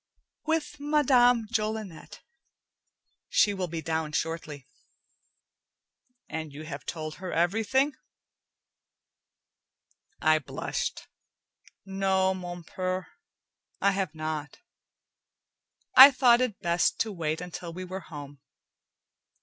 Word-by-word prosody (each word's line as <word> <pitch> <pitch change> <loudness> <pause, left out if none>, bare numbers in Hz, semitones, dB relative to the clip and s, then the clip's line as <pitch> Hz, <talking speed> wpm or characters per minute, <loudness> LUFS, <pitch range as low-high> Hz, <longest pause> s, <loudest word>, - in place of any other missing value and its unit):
"With 315 -2 -1
Madame 255 -5 +4
Jolinet. 215 -6 -4 1.1
She 205 - +3
will 190 -2 -3
be 165 -1 -5
down 160 -1 -2
shortly." 155 -4 -4 1.6
"And 160 -1 -5
you 145 +2 -9
have 140 -4 -8
told 155 -2 -5
her 185 -1 -6
everything?" 225 - +1 2.3
I 155 0 +4
blushed. 140 - -4 0.8
"No, 190 -1 +1
mon 175 -2 -7
purr, 185 +2 -3 0.7
I 200 - +3
have 190 -5 -2
not. 155 -1 -4 1.4
I 265 +2 +12
thought 255 -3 +4
it 250 -5 -1
best 170 -1 +1
to 220 - -1
wait 160 -4 -2
until 180 -1 -7
we 185 +2 -7
were 185 +1 -6
home. 145 -5 -10
185 Hz, 100 wpm, -28 LUFS, 160-220 Hz, 2.3 s, I